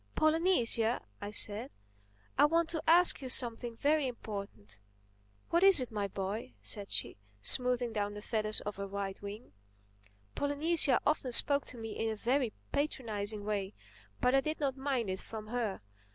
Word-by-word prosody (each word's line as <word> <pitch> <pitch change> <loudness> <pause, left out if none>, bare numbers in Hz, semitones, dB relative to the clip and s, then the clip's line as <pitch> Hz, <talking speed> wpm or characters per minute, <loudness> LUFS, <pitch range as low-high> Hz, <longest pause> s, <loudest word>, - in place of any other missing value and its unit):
"Polynesia," 310 -8 +2 0.2
I 205 - -4
said, 210 +4 -2 0.7
"I - - +6
want 330 +2 +2
to 320 -2 -2
ask 345 -2 +5
you 260 - -5
something 240 -1 +2
very 295 +1 +2
important." 200 - -7 0.7
"What 340 - +3
is 390 -4 +7
it, 250 -2 -4
my 205 -2 -2
boy?" 195 - -5
said 200 - -3
she, - - 0 0.3
smoothing 250 -2 +4
down 205 -1 -2
the 210 - -7
feathers 215 -2 -1
of 210 -1 -5
her 200 0 -4
right 195 -1 -5
wing. 205 - -8 0.8
Polynesia 285 -1 +2
often 295 -4 +1
spoke 280 +4 +4
to 250 - -6
me 225 -1 -6
in 225 +1 -2
a 220 - -2
very 245 +2 0 0.2
patronizing 215 -8 -2
way. 205 -1 -2 0.4
But 250 +1 +2
I 270 - +5
did 310 +3 -3
not 275 -3 0
mind 265 -7 -1
it 185 - -4
from 215 -1 -8
her. 225 - -2
235 Hz, 165 wpm, -32 LUFS, 205-280 Hz, 0.8 s, is